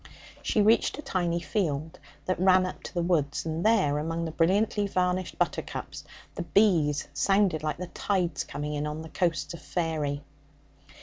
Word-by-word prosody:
She 210 - +2
reached 225 +5 +3
a 300 - -7
tiny 175 -9 0
field 160 -4 -2 0.3
that 185 - -1
ran 185 0 +5
up 185 - -6
to - - -9
the 175 - +1
woods, 155 -5 0
and 160 +1 -2
there, 195 -10 +3
among 165 +2 -2
the 160 - -3
brilliantly 200 +5 +2
varnished 180 -2 -1
buttercups, - - -3 0.3
the - - -4
bees 165 -4 +2
sounded 195 -5 +2
like 155 -1 -2
the 180 - -4
tides 175 -4 -1
coming 150 +1 -5
in 150 0 -2
on 150 +1 -5
the 160 - -9
coasts 170 -1 -1
of 170 - -9
faery. 155 -4 -2
170 Hz, 170 wpm, -28 LUFS, 155-185 Hz, 0.3 s, ran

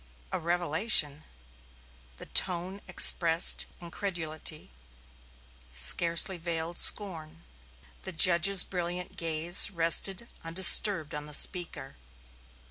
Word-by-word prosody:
"A - - -6
revelation!" 165 -2 -1 0.9
the - - -13
tone 185 +2 +2
expressed 170 -2 +2
incredulity, 165 - -7 1.0
scarcely 170 - +2
veiled 165 0 -6
scorn. 165 -5 -3 0.6
The - - -10
judge's 180 +2 +2
brilliant 180 0 -9
gaze 165 +2 +2
rested 190 +4 +1 0.2
undisturbed 165 -1 +1
on 150 0 -9
the 150 - -1
speaker. 170 -8 -2
170 Hz, 85 wpm, -25 LUFS, 160-185 Hz, 1.0 s, tone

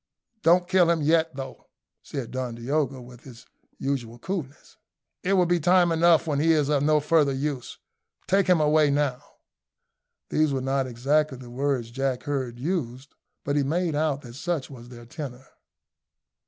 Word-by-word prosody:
"Don't 175 +2 +4
kill 185 -2 +4
him 165 -3 +1
yet, 160 0 +2
though," 135 0 -8 0.3
said 135 -5 -6
Don 125 -2 -4
Diogo, 135 +2 -1
with 125 0 -13
his 125 -3 -13 0.3
usual 125 -4 -3
coolness; 150 -1 -6 0.5
"it 190 - 0
will 185 -2 +4
be 175 0 +2
time 175 +1 +4
enough 165 0 +4
when 145 -3 -1
he 165 +2 +4
is 150 -2 +1
of 145 -2 +2
no 150 +1 +3
further 150 -1 +3
use. 135 -2 -4 0.5
Take 195 0 +2
him 180 -3 +4
away 150 0 +4
now." 140 -3 0 1.1
These 155 -2 +1
were 135 - -1
not 135 0 0
exactly 135 +4 0
the 125 -1 -11
words 130 -3 -1
Jack 135 0 -2
heard 130 -4 -3
used, 135 -3 -4 0.3
but 145 - -1
he 145 - +3
made 165 +4 0
out 145 -2 0
that 120 -2 -10
such 150 +1 -3
was 120 -2 -11
their 120 -1 -12
tenor. 130 -1 -8
145 Hz, 170 wpm, -25 LUFS, 130-160 Hz, 1.1 s, Don't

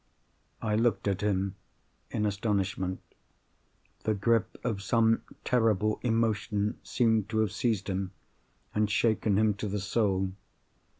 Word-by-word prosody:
I 105 -1 +1
looked 115 -1 +1
at 100 -2 0
him 100 -2 0 0.5
in 105 - -1
astonishment. 95 -3 -1 1.0
The 110 - +1
grip 115 +2 +1
of 110 -5 -1
some 115 +3 +3 0.2
terrible 110 -4 +2
emotion 110 -2 0
seemed 110 -4 +1
to 110 - -2
have 110 -4 +1
seized 110 -4 0
him, 95 -1 -2 0.6
and 105 0 +1
shaken 105 -1 +2
him 110 0 +4
to 100 +2 -4
the 105 +1 -2
soul. 95 -2 +1
105 Hz, 125 wpm, -29 LUFS, 100-115 Hz, 1.0 s, him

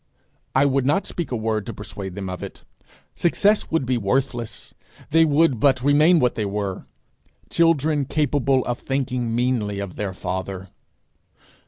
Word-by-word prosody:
I 135 +2 +5
would 135 -1 +2
not 195 +8 +2
speak 175 - -4
a - - 0
word 110 -1 -2
to 115 - -5
persuade 100 -3 -7
them 100 -1 -5
of 90 -1 -5
it. - - -9 0.5
Success 205 +5 +2
would 160 -4 0
be 125 -1 0
worthless. 120 +1 -2 0.4
They 165 +1 +5
would 150 -4 +3
but 130 -1 +3
remain 150 +5 +5
what 125 -6 +2
they 110 - -2
were 100 -1 -4 0.6
children 155 -3 +2
capable 140 -3 +1
of 120 0 -2
thinking 125 -4 -2
meanly 120 -5 0
of 100 -3 -6
their 100 -3 -3
father. 95 +1 -5
125 Hz, 155 wpm, -23 LUFS, 105-145 Hz, 0.6 s, I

